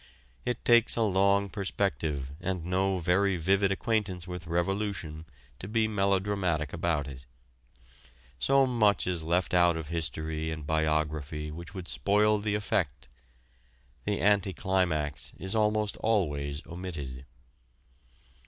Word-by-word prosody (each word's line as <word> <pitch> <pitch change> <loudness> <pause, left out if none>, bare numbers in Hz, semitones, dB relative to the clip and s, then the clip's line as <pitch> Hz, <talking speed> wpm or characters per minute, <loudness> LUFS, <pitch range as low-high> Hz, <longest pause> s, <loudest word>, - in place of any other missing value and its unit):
It 120 -1 -3
takes 120 -1 +5
a 115 - +2
long 100 0 +3
perspective 80 - -2
and 90 -2 -2
no 95 +1 +1
very 90 +2 +2
vivid 95 +4 +2
acquaintance 95 -3 -1
with 90 -2 -6
revolution 85 -2 -2 0.3
to 95 - -6
be 110 +1 +1
melodramatic 95 -6 0
about 80 -4 0
it. 65 -2 -10 1.1
So 135 - +4
much 115 -5 +2
is 90 -2 -1
left 85 +4 0
out 85 -2 +4
of 80 -2 -6
history 80 -1 -3
and 80 -2 -5
biography 75 -1 -1
which 85 +4 -9
would 90 -2 -6
spoil 105 +1 +2
the 105 0 -1
effect. 75 -10 -1 1.0
The 105 - 0
anti 100 -1 +3
climax 80 -5 0
is 95 0 -2
almost 105 -1 +1
always 75 -10 0
omitted. 75 -8 -7
90 Hz, 125 wpm, -29 LUFS, 80-100 Hz, 1.1 s, takes